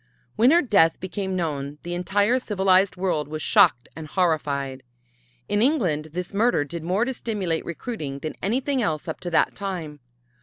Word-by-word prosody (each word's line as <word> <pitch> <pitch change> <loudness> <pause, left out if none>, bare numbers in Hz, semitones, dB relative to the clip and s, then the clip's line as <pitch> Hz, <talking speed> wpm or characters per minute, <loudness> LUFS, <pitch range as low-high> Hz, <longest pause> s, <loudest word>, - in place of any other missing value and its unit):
When 235 +3 +5
her 340 +4 +5
death 195 - +3
became 190 +1 -4
known, 145 -5 -3
the 175 - -4
entire 200 +7 +1
civilized 190 -4 +2
world 180 -5 -1
was 155 0 -5
shocked 120 +1 +4
and 160 -1 -7
horrified. 140 -6 -1 0.7
In 205 0 +1
England 190 - +1
this 180 +1 -5
murder 220 -5 +2
did 165 +3 -6
more 185 +8 0
to 265 - -2
stimulate 200 -9 -2
recruiting 165 - -5
than 155 +2 -5
anything 255 +6 0
else 155 -8 -2
up - - -4
to 175 - -5
that 165 - +2
time. 175 -7 -5
180 Hz, 165 wpm, -24 LUFS, 155-205 Hz, 0.7 s, When